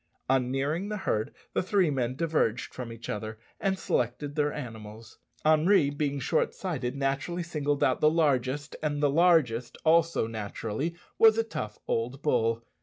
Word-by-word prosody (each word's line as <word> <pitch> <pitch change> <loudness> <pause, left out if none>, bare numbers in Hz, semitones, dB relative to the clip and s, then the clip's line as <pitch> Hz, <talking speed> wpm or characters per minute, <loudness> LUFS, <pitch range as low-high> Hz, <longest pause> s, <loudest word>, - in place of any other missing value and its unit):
On 130 -1 +2
nearing 150 +9 -1
the 210 - -2
herd, 110 - -1 0.2
the - - +1
three 185 -3 +2
men 130 -2 -1
diverged 150 -7 0
from 125 -2 -6
each 115 0 -9
other 110 +1 -4 0.2
and 195 -1 0
selected 125 0 -1
their 150 -1 +1
animals. 110 -5 -9 0.3
Henri, 155 0 +4
being 145 -1 -1
short 145 +5 0
sighted, 135 -9 -3
naturally 140 +6 -1
singled 145 -4 -1
out 130 - +2
the 150 - +6
largest; 145 -3 0
and 150 -1 -1
the 145 - +4
largest 150 -8 +3
also 165 -3 +4
naturally 115 +7 -4 0.2
was 220 -1 +7
a 225 - +3
tough 105 - -5
old 125 +5 -2
bull. 115 -5 +1
140 Hz, 160 wpm, -28 LUFS, 120-160 Hz, 0.3 s, was